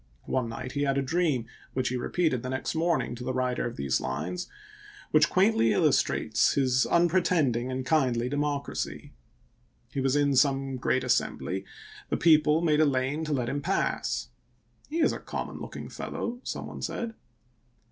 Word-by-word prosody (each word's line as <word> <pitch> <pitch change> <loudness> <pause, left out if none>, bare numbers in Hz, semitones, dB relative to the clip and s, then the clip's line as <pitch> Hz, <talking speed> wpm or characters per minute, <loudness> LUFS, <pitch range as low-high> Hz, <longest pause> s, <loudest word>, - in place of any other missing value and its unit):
One 125 -3 -1
night 115 +2 -6
he 145 - -2
had 140 -1 +1
a 140 - +1
dream, 150 -5 +1 0.3
which 130 -1 0
he 125 - -2
repeated 130 0 0
the 130 - -5
next 130 0 -2
morning 160 -7 0
to 120 +1 -7
the 130 +1 -2
writer 125 -1 0
of 120 - -6
these 70 -1 0
lines, 75 - -3 0.6
which 150 0 +5
quaintly 185 - +3
illustrates - - +2
his 130 -2 +2
unpretending 170 -8 +2
and 130 0 -3
kindly 130 -6 +2
democracy. 145 +1 -3 0.8
He 135 - -2
was 135 +1 +2
in 145 -1 +3
some 135 0 +2
great 130 +1 +1
assembly; 95 +1 -1 0.4
the - - 0
people 155 0 +4
made 155 -2 +3
a - - +6
lane 135 +3 0
to 155 - -1
let 125 -4 0
him 145 +3 -2
pass. - - -1 0.3
" 120 - -34
He 325 +2 -1
is - - +3
a - - -5
com - - -5
mon - - -9
looking - - -7
fellow," 240 +1 -5
some - - -4
one - - -8
said. 230 -1 -3
135 Hz, 175 wpm, -28 LUFS, 125-155 Hz, 0.8 s, a